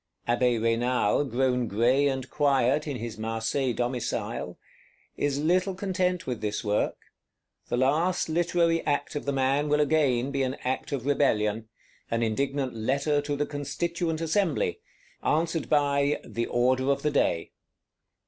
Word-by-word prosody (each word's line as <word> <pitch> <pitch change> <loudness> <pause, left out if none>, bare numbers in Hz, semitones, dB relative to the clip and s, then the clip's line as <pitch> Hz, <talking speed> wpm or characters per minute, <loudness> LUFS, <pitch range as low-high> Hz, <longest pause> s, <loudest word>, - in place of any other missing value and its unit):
Abbé 120 0 +2
Raynal, 115 +3 +1
grown 125 -1 0
gray 125 +7 +3
and 130 -2 -2
quiet 140 0 +2
in 145 - -3
his 115 -1 -6
Marseilles 115 +3 -1
domicile, 120 -1 -3 0.6
is 145 -1 0
little 180 +5 +1
content 185 -2 -1
with 125 -3 -4
this 105 -1 -2
work; 105 -1 0 0.7
the - - -1
last 155 +8 +2
literary 170 0 +1
act 145 0 -1
of 145 - -3
the 140 - 0
man 135 +2 +1
will 150 0 +3
again 140 -4 +2
be 140 -1 -1
an 130 0 -1
act 130 +3 -2
of 135 -3 -3
rebellion: 110 -6 +1 0.4
an 115 0 0
indignant 135 +3 -1
Letter 140 +6 0
to 145 0 -2
the 145 +1 0
Constituent 160 +3 -3
Assembly; 200 - 0 0.4
answered 165 0 0
by 145 -1 +2
"the 115 0 -3
order 130 +2 +1
of 140 0 +1
the 150 - +1
day." 85 -12 0
140 Hz, 145 wpm, -27 LUFS, 120-150 Hz, 0.7 s, gray